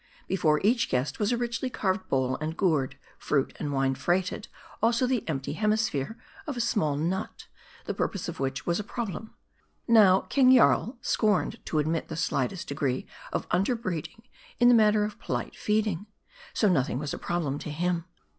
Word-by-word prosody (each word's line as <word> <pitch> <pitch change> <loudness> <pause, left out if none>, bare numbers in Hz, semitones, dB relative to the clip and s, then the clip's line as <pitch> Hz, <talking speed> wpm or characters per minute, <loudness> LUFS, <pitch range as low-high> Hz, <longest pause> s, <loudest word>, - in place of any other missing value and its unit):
Before 160 -5 +2
each 230 +3 +2
guest 130 +2 -1
was 210 +1 +1
a 240 - +1
richly 240 +2 -2
carved 190 -4 -2
bowl 130 -1 +1
and 155 +2 -4
gourd, 145 -8 +1 0.2
fruit 140 -2 0
and 145 - -2
wine 135 -1 +1
freighted; 180 - -1 0.3
also 235 +3 +3
the 250 -3 0
empty 135 -2 -2
hemisphere 215 -3 0 0.3
of 285 -4 -3
a - - -2
small 185 -11 +1
nut, 175 +7 -3 0.4
the - - -2
purpose 200 - -2
of 170 -2 -6
which 135 -2 -2
was 170 +2 0
a - - -2
problem. 220 -1 -5 0.5
Now, 205 -5 +6
King 260 -2 +5
Jarl 245 0 +4
scorned 210 -4 +1
to 155 - -1
admit 155 +2 0
the 160 - -6
slightest 165 +2 -1
degree 140 -3 -1 0.3
of - - -2
under 195 +8 +2
breeding 185 0 -5 0.4
in 240 0 +6
the - - +7
matter 215 -2 +5
of 210 0 -4
polite - - -3
feeding. 210 -3 0 0.4
So 215 - +2
nothing 135 -9 +1
was 145 +1 -3
a - - -5
problem 155 -5 -2
to - - -6
him. 170 +2 -1
180 Hz, 175 wpm, -27 LUFS, 150-220 Hz, 0.5 s, the